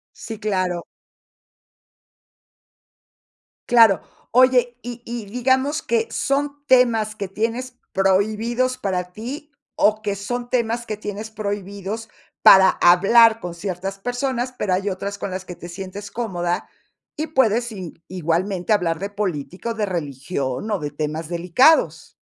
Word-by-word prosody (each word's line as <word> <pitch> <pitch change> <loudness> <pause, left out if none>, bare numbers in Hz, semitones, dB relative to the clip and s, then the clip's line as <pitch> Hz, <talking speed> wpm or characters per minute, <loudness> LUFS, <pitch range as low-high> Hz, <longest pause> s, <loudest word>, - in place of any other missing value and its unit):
Sí, 225 -2 -8
claro. 185 -5 -1 2.9
Claro, 225 -7 +6 0.3
oye, 250 -1 +4
y 240 0 -8
y 235 -2 -5
digamos 260 +6 +1
que 230 -1 0
son 280 +4 -1
temas 235 -5 +3
que 200 -2 -4
tienes 230 +5 -3 0.2
prohibidos 220 +6 +1
para 180 -2 -2
ti 280 - -7 0.2
o 215 +1 +3
que 205 -2 -2
son 240 +5 -4
temas 235 -1 -1
que 215 - -3
tienes 210 +1 -6
prohibidos 205 +1 -5 0.3
para 190 0 +8
hablar 220 +6 +6
con 175 -5 -6
ciertas 190 +2 -5
personas, 245 +2 -2
pero 195 -3 0
hay 195 +2 0
otras 200 +1 -5
con - - -3
las 185 0 -5
que 180 - -8
te 175 - -10
sientes 195 +3 -7
cómoda 175 -7 -2 0.5
y 310 - -3
puedes 240 -5 +2
i-igualmente 180 +1 -2
hablar 170 -5 +1
de 200 +4 -5
política 190 0 -3
o - - -2
de 215 -2 0
religión 140 - -3
o 205 - 0
de 150 -1 -3
temas 155 +2 -4
delicados. 180 - +3
210 Hz, 130 wpm, -22 LUFS, 185-240 Hz, 2.9 s, para